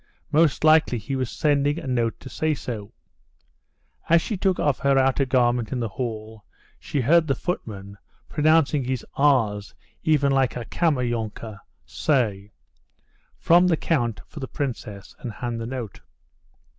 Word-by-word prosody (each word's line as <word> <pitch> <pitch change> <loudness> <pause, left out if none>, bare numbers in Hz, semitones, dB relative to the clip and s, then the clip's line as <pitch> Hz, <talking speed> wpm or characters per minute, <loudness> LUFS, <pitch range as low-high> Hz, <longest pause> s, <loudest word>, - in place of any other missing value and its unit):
Most 155 -1 +3
likely 155 -5 +5
he 125 +5 -4
was 130 -2 -2
sending 145 0 +1
a 165 - -6
note 120 -3 -1
to - - -10
say 155 +3 -1
so. 110 -6 -6 1.2
As 170 +1 +6
she 210 - -3
took 190 -1 0
off 145 -3 +1
her 140 -1 +2
outer 135 +1 +3
garment 120 -3 +1
in 130 - -2
the 115 - -1
hall, 110 0 -6 0.4
she 140 - -2
heard 160 +6 +4
the 135 - +1
footman, 100 - -5 0.3
pronouncing 155 -2 +3
his 130 -1 -3
"r's" 115 -8 +1 0.3
even 145 -3 +2
like 135 -3 +2
a 120 -2 -5
Kammerjunker, 120 - -2 0.3
say, 105 -8 -1 0.9
"From 175 +2 +5
the 165 -3 +2
count 120 - -1
for 155 - -11
the 130 - -5
princess," 110 -9 -5
and 125 -6 -5
hand 120 +2 -4
the 115 - -4
note. 120 -6 -6
130 Hz, 150 wpm, -24 LUFS, 115-150 Hz, 1.2 s, As